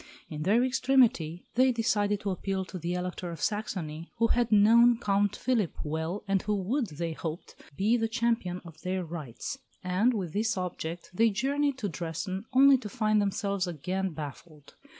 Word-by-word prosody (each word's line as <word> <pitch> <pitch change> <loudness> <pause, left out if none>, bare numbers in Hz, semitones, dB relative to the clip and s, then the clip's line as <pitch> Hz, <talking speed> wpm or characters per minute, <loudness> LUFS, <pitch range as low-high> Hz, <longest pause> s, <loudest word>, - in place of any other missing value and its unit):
In 155 -1 -5
their 210 +9 +3
extremity, 245 -10 +2
they 255 +2 +4
decided 210 -3 +1
to 200 - -1
appeal 190 +1 -2
to 185 +1 -7
the 175 +2 -2
Elector 180 0 -4
of 170 - -7
Saxony, 170 -7 -3
who 230 0 +2
had 240 -1 +1
known 230 +3 +6
Count 205 -2 +1
Philip 230 -9 0
well 160 +5 -3
and 195 -1 +2
who 210 0 -1
would, 225 +7 -1
they 165 0 -4
hoped, 160 +1 -6 0.2
be 220 +5 +3
the 225 -1 0
champion 230 -6 -1
of 160 -2 -12
their 185 0 -2
rights; 155 -8 -6 0.2
and, 195 +7 +2
with 180 -6 -3
this 220 +1 0
object, 175 -2 -5
they 230 +5 +4
journeyed 275 +6 0
to 220 -5 -2
Dresden, 185 +3 -4
only 270 +1 +6
to 215 -4 -7
find 215 -1 +2
themselves 200 -1 -1
again 185 +4 -2
baffled. 150 -1 -9
195 Hz, 170 wpm, -29 LUFS, 175-230 Hz, 0.2 s, known